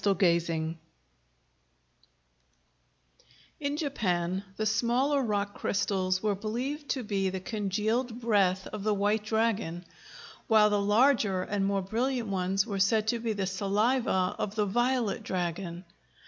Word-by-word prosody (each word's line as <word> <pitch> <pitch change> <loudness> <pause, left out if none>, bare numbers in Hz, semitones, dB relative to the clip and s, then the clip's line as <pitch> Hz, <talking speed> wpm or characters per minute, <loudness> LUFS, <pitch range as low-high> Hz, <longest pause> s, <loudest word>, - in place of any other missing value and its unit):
] 195 -3 +1
In 165 -2 +1 3.0
Japan 190 - -1
the 215 - -1
smaller 240 +6 +2
rock 205 -4 -1
crystals 185 -2 -1
were 210 -1 +2
believed 250 +9 -4
to 260 - -1
be 195 -3 0
the 190 0 -4
congealed 220 +4 -1
breath 195 -5 +2
of 215 - -4
the 210 +1 +1
White 205 +2 +1
Dragon, 210 -6 -1 0.6
while 215 -2 +5
the 205 -1 +2
larger 205 -3 +3
and 200 0 -1
more 195 -1 0
brilliant 235 +3 -1
ones 190 0 0
were 200 -4 -3
said 210 +2 +2
to 235 - 0
be 230 -1 -1
the 200 -2 -2
saliva 200 +1 +1
of 205 0 -3
the 210 -1 +1
Violet 240 +1 0
Dragon. 175 0 -3
205 Hz, 130 wpm, -29 LUFS, 190-230 Hz, 3.0 s, while